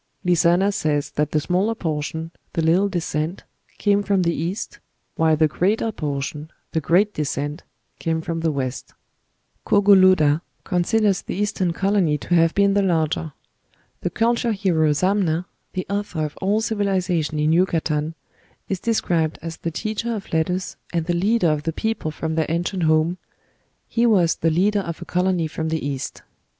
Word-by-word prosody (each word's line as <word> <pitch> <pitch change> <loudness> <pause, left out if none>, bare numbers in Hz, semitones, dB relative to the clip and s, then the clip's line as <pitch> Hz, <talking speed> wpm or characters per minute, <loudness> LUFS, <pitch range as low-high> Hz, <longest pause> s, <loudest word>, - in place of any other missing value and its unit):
Lizana 180 +3 +3
says 150 -6 -1
that 150 0 0
the 155 - +1
smaller 185 +8 0
portion, 160 -1 -3 0.2
'the 165 - 0
little 180 +5 +3
descent,' 165 -2 -2 0.3
came 205 -1 +2
from 200 -2 +1
the 170 -1 +1
East, 175 +7 -4 0.4
while 160 -1 +3
the 155 0 +4
greater 205 +8 0
portion, 150 -1 -4 0.2
'the 160 - 0
great 195 +7 +3
descent,' 145 +1 -3 0.4
came 165 -1 -1
from 165 0 -3
the 165 -1 +1
West. 130 -3 -4 0.7
Cogolluda 185 -7 +5 0.2
considers 195 +2 +1
the - - -5
Eastern 195 -3 0
colony 190 -4 +1
to 175 - -4
have 165 -1 +4
been 200 0 +4
the 200 - +3
larger.... 160 -4 0 0.7
The - - -2
culture 235 0 +1
hero 175 -6 +2
Zamna, 180 +1 +1 0.3
the 185 -1 -3
author 200 -6 -2
of 150 - -6
all 205 +3 +2
civilization 185 -8 0
in 150 +1 +2
Yucatan, 165 -3 +1 0.5
is 190 - -2
described 170 -8 0
as 165 -1 -5
the 170 - -3
teacher 220 +7 -3
of 200 -5 -8
letters, 180 +3 -1
and 170 -2 -1
the 175 - 0
leader 190 +1 +2
of 150 -1 -1
the 165 +2 -3
people 220 -4 -2
from 160 +1 -3
their 160 0 0
ancient 175 +3 -1
home.... 160 +3 +2 0.7
He 235 +1 +2
was 180 -7 +4
the 165 - +1
leader 195 +6 +2
of 170 -3 -6
a - - -12
colony 180 -2 +1
from 160 +1 -3
the 160 -3 -2
East." 140 -2 -4
170 Hz, 160 wpm, -22 LUFS, 160-195 Hz, 0.7 s, Cogolluda